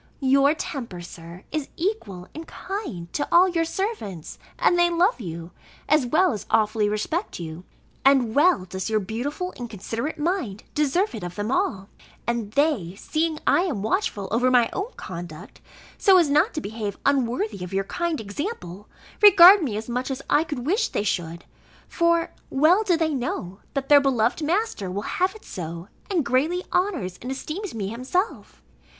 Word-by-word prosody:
Your 275 Hz, +3 st, +4 dB
temper, 235 Hz, -, -5 dB
Sir, 170 Hz, +1 st, -11 dB
is 305 Hz, -2 st, -3 dB
equal 275 Hz, -, -3 dB
and 320 Hz, +1 st, -8 dB
kind 335 Hz, -, -6 dB
to 290 Hz, -, -1 dB
all 355 Hz, +2 st, +7 dB
your 340 Hz, -2 st, +1 dB
servants, 325 Hz, -, -4 dB, 0.2 s
and -, -, +3 dB
they 345 Hz, 0 st, +4 dB
love 345 Hz, -, +2 dB
you, 170 Hz, -2 st, -7 dB, 0.4 s
as 295 Hz, -4 st, +3 dB
well 345 Hz, +6 st, +3 dB
as 210 Hz, -, -6 dB
awfully 215 Hz, -1 st, +2 dB
respect 215 Hz, -, -2 dB
you: 165 Hz, +1 st, -7 dB, 0.4 s
and 265 Hz, -5 st, +4 dB
well 290 Hz, -, +4 dB
does 190 Hz, +3 st, -4 dB
your 215 Hz, -1 st, +2 dB
beautiful 260 Hz, -, -4 dB
and 240 Hz, -1 st, -6 dB
considerate 225 Hz, +8 st, -4 dB
mind, 300 Hz, -, -2 dB
deserve 300 Hz, +8 st, +1 dB
it 215 Hz, -, -6 dB
of 175 Hz, 0 st, -6 dB
them 205 Hz, +3 st, -3 dB
all: 265 Hz, -, 0 dB, 0.4 s
and 235 Hz, -3 st, -2 dB
they, 275 Hz, -, +1 dB
seeing 315 Hz, +8 st, -1 dB
I -, -, +4 dB
am 285 Hz, -, -2 dB
watchful 215 Hz, -, -1 dB
over 245 Hz, +3 st, +3 dB
my 245 Hz, -2 st, +4 dB
own 395 Hz, +5 st, -3 dB
conduct, 170 Hz, -4 st, -9 dB, 0.4 s
so 385 Hz, -2 st, +6 dB
as 330 Hz, -5 st, +3 dB
not 310 Hz, +9 st, +3 dB
to 305 Hz, -, -2 dB
behave 210 Hz, -2 st, -5 dB
unworthy 235 Hz, -7 st, 0 dB
of 180 Hz, -, -7 dB
your 195 Hz, 0 st, 0 dB
kind 340 Hz, -, -2 dB
example, 205 Hz, -, -6 dB, 0.3 s
regard 390 Hz, -1 st, +9 dB
me 240 Hz, -10 st, -2 dB
as 220 Hz, -, -5 dB
much 250 Hz, +2 st, -2 dB
as 270 Hz, 0 st, -4 dB
I 300 Hz, -, +5 dB
could 290 Hz, -6 st, -5 dB
wish 395 Hz, -, +2 dB
they -, -, -2 dB
should; 170 Hz, -4 st, -3 dB, 0.4 s
for 335 Hz, -1 st, +1 dB, 0.2 s
well 315 Hz, +9 st, +4 dB
do 370 Hz, -6 st, +2 dB
they 320 Hz, -2 st, 0 dB
know, 205 Hz, -7 st, -4 dB, 0.2 s
that 275 Hz, -1 st, -2 dB
their 290 Hz, -1 st, +7 dB
beloved 250 Hz, 0 st, +1 dB
master 330 Hz, -, -1 dB
will 195 Hz, +3 st, -3 dB
have 370 Hz, -, 0 dB
it 435 Hz, -, -14 dB
so, 170 Hz, +1 st, -7 dB, 0.2 s
and 345 Hz, -8 st, 0 dB
greatly 310 Hz, +9 st, +1 dB
honours 325 Hz, -, -1 dB
and 250 Hz, -, -6 dB
esteems 315 Hz, -, -5 dB
me 200 Hz, -3 st, -3 dB
himself. 265 Hz, -, -3 dB
265 Hz, 175 wpm, -24 LUFS, 205-340 Hz, 0.4 s, regard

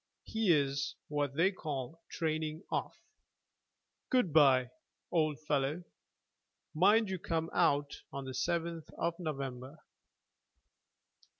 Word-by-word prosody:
He's 145 Hz, -10 st, +1 dB
what 145 Hz, -2 st, -1 dB
they 175 Hz, +5 st, +4 dB
call 150 Hz, -3 st, -5 dB
training 155 Hz, +1 st, -2 dB
off. -, -, -2 dB, 1.1 s
Good 250 Hz, -, +2 dB
bye, 130 Hz, -5 st, +5 dB, 0.4 s
old 155 Hz, -3 st, +1 dB
fellow. 145 Hz, +4 st, 0 dB, 0.9 s
Mind 205 Hz, +7 st, +5 dB
you 190 Hz, -, -2 dB
come 165 Hz, 0 st, -2 dB
out 145 Hz, -4 st, +2 dB
on 140 Hz, -1 st, -5 dB
the 130 Hz, -, -5 dB
7th 165 Hz, +5 st, -2 dB
of 170 Hz, 0 st, 0 dB
November." 135 Hz, -3 st, -5 dB
155 Hz, 100 wpm, -33 LUFS, 140-170 Hz, 1.1 s, bye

